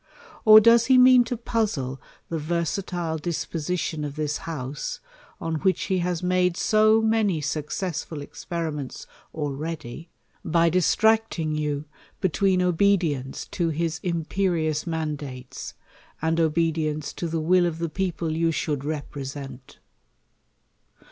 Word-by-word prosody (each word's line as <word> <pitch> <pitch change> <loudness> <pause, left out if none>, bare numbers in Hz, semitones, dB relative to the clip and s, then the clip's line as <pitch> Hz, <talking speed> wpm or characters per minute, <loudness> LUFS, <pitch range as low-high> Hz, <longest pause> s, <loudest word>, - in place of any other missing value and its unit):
or 215 0 +11
does 230 +1 +5
he 260 -1 +6
mean 255 0 +7
to 240 +1 -4
puzzle 195 - -2 0.3
the 165 - -3
versatile 170 +1 -2
disposition 165 0 -3
of 145 -1 -5
this 150 -1 -1
House, 145 -2 -4 0.4
on 165 -1 -2
which 185 +3 +1
he 190 -1 0
has 175 -1 -2
made 180 -1 +2
so 215 +1 +4
many 220 -6 +2
successful 155 +2 -3
experiments 150 -1 -5 0.3
already, 155 0 -5 0.3
by 170 0 +3
dis^ 180 -1 +2
tracting 220 -8 +2
you 150 -1 -2 0.3
between 190 0 +2
obedience 170 -7 +1
to 170 -2 -1
his 160 0 -2
impci 170 0 -1
ious 155 +2 -2
man 160 -2 -1
dates, 130 -3 -8 0.4
and 165 +1 0
obedience 155 -2 0
to 170 - -4
the 165 0 -2
will 175 +3 +3
of 165 -2 -3
the 170 0 -2
people 170 -2 -2
you 165 +1 +2
should 150 -3 -2
represent 140 -3 -6
165 Hz, 130 wpm, -25 LUFS, 150-185 Hz, 0.4 s, or